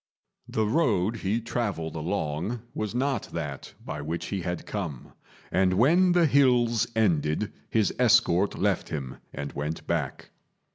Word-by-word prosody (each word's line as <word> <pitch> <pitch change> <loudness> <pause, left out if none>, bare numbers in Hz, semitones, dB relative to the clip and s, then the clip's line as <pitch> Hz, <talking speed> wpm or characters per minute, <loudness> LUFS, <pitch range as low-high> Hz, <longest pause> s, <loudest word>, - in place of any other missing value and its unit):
The 110 - +1
road 115 - +2
he 105 +2 0
travelled 105 -9 -3
along 85 +6 -2
was 110 +1 -3
not 130 -3 0
that 75 -5 -5
by - - -4
which 80 +3 -3
he 100 -2 -2
had 90 0 -4
come; 80 - -5 0.4
and 95 -1 +3
when 170 - +5
the 175 -1 +5
hills 125 -5 +3
ended, 90 -2 +1 0.2
his 110 -3 +2
escort 110 -6 +4
left - - 0
him 65 -3 -5
and 70 0 -5
went 75 +3 -4
back. - - -3
100 Hz, 140 wpm, -27 LUFS, 80-120 Hz, 0.4 s, when